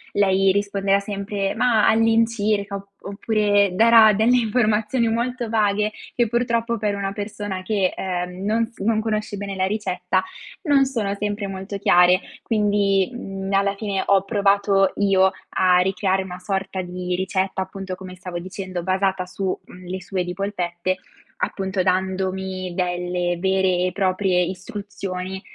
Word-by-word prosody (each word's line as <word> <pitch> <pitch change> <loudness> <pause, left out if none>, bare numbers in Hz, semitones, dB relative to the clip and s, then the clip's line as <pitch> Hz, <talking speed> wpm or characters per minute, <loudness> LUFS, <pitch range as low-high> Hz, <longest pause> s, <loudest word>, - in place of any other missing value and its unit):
lei 195 -1 +4
risponderà 200 0 +1
sempre: 200 0 -3
"Mah, 235 -4 +3
all'incirca" 220 -2 +2
op 200 0 -8 0.2
oppure 205 -1 +1
darà 225 +1 +7
delle 225 +5 +3
informazioni 225 0 +1
molto 240 +1 -2
vaghe 210 -1 +1 0.2
che 240 -1 +2
purtroppo 235 0 0
per 210 -1 -1
una 195 -1 -2
persona 205 -2 -5
che, 195 -2 +1
ehm, 180 0 -4
non 225 +2 +1
s 230 - -24
non 220 +2 +1
conosce 215 -2 -2
bene 200 0 -5
la 185 0 +1
ricetta, 185 -2 -1 0.5
non 275 -2 +5
sono 225 -7 -2
sempre 205 0 -3
molto 195 +1 -6
chiare. 180 0 +5 0.2
Quindi, 205 -3 +2
mhmm, 195 -5 -6
alla 195 0 +2
fine 200 -2 -2
ho 195 -1 +4
provato 200 -1 +2
io 190 -1 +4 0.2
a 185 -1 +3
ricreare 190 +1 +1
una 180 -1 -8
sorta 190 0 -3
di 180 0 -4
ricetta, 190 +1 -1
appunto, 190 0 -7
come 185 0 -10
stavo 180 -1 -6
dicendo, 185 -1 -6
basata 190 0 0
su, 190 +1 -3
mhmm, 180 0 -13
le 185 +1 -4
sue 185 +1 -2
di 180 0 -5
polpette, 185 -2 -2 0.4
appunto 195 - -2
dandomi 190 0 -1
delle 180 -1 -1
vere 190 -1 +2
e - - -2
proprie 185 -1 +1
istruzioni, 190 0 -5
195 Hz, 145 wpm, -22 LUFS, 185-210 Hz, 0.5 s, darà